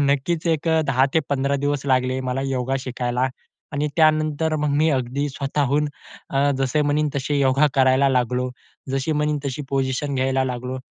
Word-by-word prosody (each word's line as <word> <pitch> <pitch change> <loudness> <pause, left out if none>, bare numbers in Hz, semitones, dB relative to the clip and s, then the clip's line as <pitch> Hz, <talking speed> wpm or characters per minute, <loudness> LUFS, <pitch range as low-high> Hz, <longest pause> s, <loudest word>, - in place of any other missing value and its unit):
नक्कीच 155 +5 0
एक 165 0 0
अ, 160 0 +3
10-15 140 +1 +1
दिवस 145 0 -1
लागले 130 0 +1
मला 135 +2 -1
योगा 135 0 -1
शिकायला 125 0 -1 0.4
आणि 150 +1 -1
त्यानंतर 155 0 +2
मग 150 0 0
मी 155 +2 +3
अगदी 135 +2 -1
स्वतःहून 140 +1 0 0.4
अ, 140 +1 +2
जसे 135 +3 +1
म्हणीन 150 +1 +1
तसे 140 +1 -1
योगा 135 +2 +4
करायला 135 +1 +4
लागलो. 125 0 0 0.4
जशी 135 +3 -1
म्हणीन 150 0 0
तशी 140 +1 -3
पोजिशन 135 +1 -1
घ्यायला 130 0 +1
लागलो. 125 0 -4
135 Hz, 155 wpm, -22 LUFS, 130-150 Hz, 0.4 s, योगा